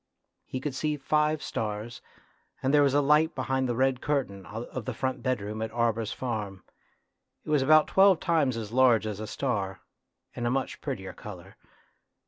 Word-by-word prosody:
He 130 - -4
could 140 +1 -3
see 150 +3 -1
five 150 +2 +1
stars, 110 +2 -4 0.6
and 135 +2 +1
there 145 - +6
was 140 -1 +3
a 145 - +5
light 150 +3 +3
behind 130 -1 -1
the 120 - 0
red 130 0 +1
curtain 110 - -2
of 115 +4 -6
the 130 - -4
front 130 +1 -2
bedroom 110 -4 -2
at 110 - -2
Arber's 115 -2 0
farm. 105 -6 -4 0.8
It - - -5
was 150 -2 +4
about 155 +3 +6
twelve 190 -3 +5
times 155 -8 +1
as 110 -2 -5
large 120 -3 +4
as 105 -2 -4
a 110 - -5
star, 100 -8 -2 0.5
and 120 -1 -2
a - - +2
much 135 +2 -2
prettier - - -5
colour. - - -10
130 Hz, 175 wpm, -28 LUFS, 110-145 Hz, 0.8 s, there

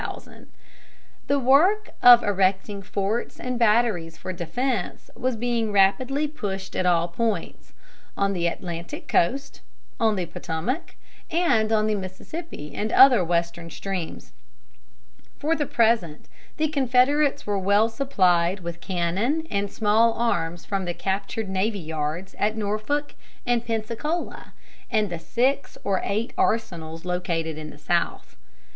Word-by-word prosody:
The 280 - +2
work 320 - +4
of 245 -1 +9
erecting 195 0 0
forts 200 +4 -2
and 250 -1 -3
batteries 210 -8 +2
for 185 - -5
defense 230 +10 -3
was 255 -1 -1
being 230 -1 -1
rapidly 255 +9 +2
pushed 195 -10 -5
at 185 - +1
all 170 -1 +3
points: 220 +5 -3 0.4
on 200 0 +1
the 170 -2 0
Atlantic 170 -1 -5
coast, 270 +11 0 0.4
on 220 -2 +3
the 185 -3 -2
Potomac, 170 - -4 0.3
and 275 -11 +2
on 215 -1 +3
the 215 - +1
Mississippi 190 - -7
and 215 +1 -2
other 255 -7 +7
Western 170 0 -1
streams. 180 - -5 1.1
For 315 +3 0
the 295 -3 -2
present 220 -10 +1 0.3
the 315 - +2
Confederates 280 +1 +2
were 205 -1 0
well 200 +3 +3
supplied 190 -8 +1
with 170 0 -6
cannon 195 - -1
and 200 0 -1
small 225 +2 +3
arms 175 -8 -1
from 195 -2 -2
the 175 -1 -3
captured 200 +3 -2
navy 195 +3 0
yards 160 +2 -4
at 215 +1 +1
Norfolk 215 +8 -2 0.3
and 240 -1 +1
Pensacola 230 +9 -3 0.3
and 215 -5 +1
the 170 - -4
six 255 +11 0
or 195 -2 0
eight 215 +4 -2
arsenals 165 -7 -1
located 165 -3 -2
in 155 0 -7
the 145 - -12
South. 170 - -2
205 Hz, 130 wpm, -24 LUFS, 175-245 Hz, 1.1 s, of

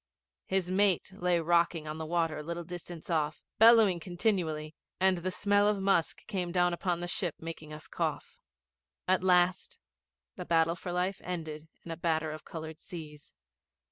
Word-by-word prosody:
His 190 -1 0
mate 190 -1 +2
lay 180 -2 +1
rocking 170 -1 +2
on 155 +1 -5
the 160 - -4
water 165 -2 0
a - - -4
little 170 +2 -5
distance 175 -1 -8
off, 155 -2 -1 0.2
bellowing 220 -5 +7
continually, 175 -4 -1 0.3
and 190 -1 +4
the 185 +2 -2
smell 205 +2 +2
of 210 -1 +2
musk 195 -4 +1
came 180 -4 -3
dawn 175 0 +2
upon 175 0 -1
the 175 - -3
ship 175 -2 -2
making 160 -2 -8
us 150 0 -9
cough. - - -3 0.7
At 185 0 +2
last 185 - +2 0.6
the 180 - -5
battle 165 -1 +3
for 175 +1 -6
life 180 +2 -1
ended 160 -3 -5 0.2
in 170 - -7
a 165 - -5
batter 160 -2 0
of 155 - -8
coloured 160 -1 -7
seas. 150 -4 -10
175 Hz, 170 wpm, -30 LUFS, 160-185 Hz, 0.7 s, bellowing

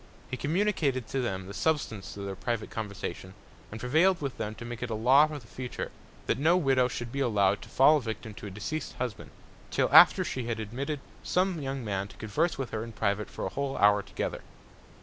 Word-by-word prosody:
He - - -1
communicated 150 - 0
to 135 - -1
them 95 -6 -2
the 100 - -8
Substance 115 -9 -1
of 100 - -5
their 100 -1 -4
private 115 +3 -3
Conversation, 100 -3 -5 0.3
and 110 - -7
prevailed 160 +10 +3
with 140 -3 -4
them 110 0 -3
to 120 - -8
make 120 -1 -6
it 125 - -3
a 110 - -2
Law 130 +7 +6
for 155 -1 -6
the 125 - -12
future, 125 +2 -6 0.3
that 115 - 0
no 165 +5 +4
Widow 135 -6 +3
should 120 -1 -5
be 140 - -3
allow'd 105 -6 +2
to - - -11
fall 150 +4 +6
a - - -2
Victim 110 -2 -5
to 105 - -8
a - - -5
deceased 105 +10 -4
Husband, 125 -4 -4 0.4
till - - 0
after - - +9
she 130 -2 -3
had 115 -1 -2
admitted 135 +7 -4 0.2
some 180 -3 0
young 135 -2 -4
Man 100 -1 -2
to - - -15
converse 150 +11 0
with 135 -2 -4
her 110 -1 -2
in 115 -1 -8
private 105 0 -1
for - - -5
a - - -1
whole 140 -1 -3
Hour 105 0 +5
together. - - -4
120 Hz, 220 wpm, -29 LUFS, 105-140 Hz, 0.4 s, after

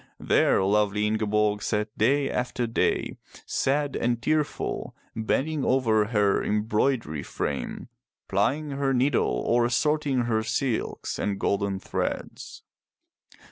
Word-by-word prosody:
There - - +3
lovely 105 +1 +2
Ingeborg 105 -1 +1
sat 105 0 -2
day 135 +6 +2
after 125 -1 -2
day, 115 - 0 0.3
sad 145 +1 0
and 120 0 0
tearful, 155 +4 -1 0.2
bending 140 +7 0
over 115 -5 +3
her 105 -2 +2
embroidery 105 - 0
frame, - - -4 0.4
plying 140 +10 0
her 135 -1 0
needle 130 +1 +1
or 120 0 +3
sorting 145 0 +1
her 115 -2 +1
silks 120 +2 -2
and 100 -1 -1
golden 100 -1 0
threads. - - -4
115 Hz, 110 wpm, -26 LUFS, 105-135 Hz, 0.4 s, There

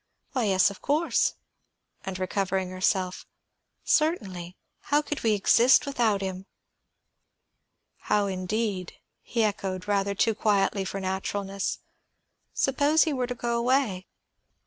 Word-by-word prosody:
"Why, 255 -4 0
yes, 195 0 +4
of 200 - -12
course." 305 +4 +1 0.7
And 190 -1 -5
recovering 190 0 -1
herself, 185 0 -1 0.6
"Certainly; 190 - 0 0.2
how 295 +1 +1
could 295 -1 -4
we 225 -2 +3
exist 235 +7 +5
without 235 -7 +1
him?" 190 0 -5 1.6
"How, 205 -1 +2
indeed?" 190 0 -2 0.3
he 230 -2 -1
echoed, 195 -3 -2
rather 200 -1 0
too 225 +3 +2
quietly 200 -2 +1
for 195 +1 -4
naturalness. 195 +1 -3 0.7
"Suppose 285 +4 +3
he 315 - -1
were 255 -2 -1
to 250 - -4
go 235 0 -2
away?" 235 -6 +1
200 Hz, 120 wpm, -27 LUFS, 190-245 Hz, 1.6 s, exist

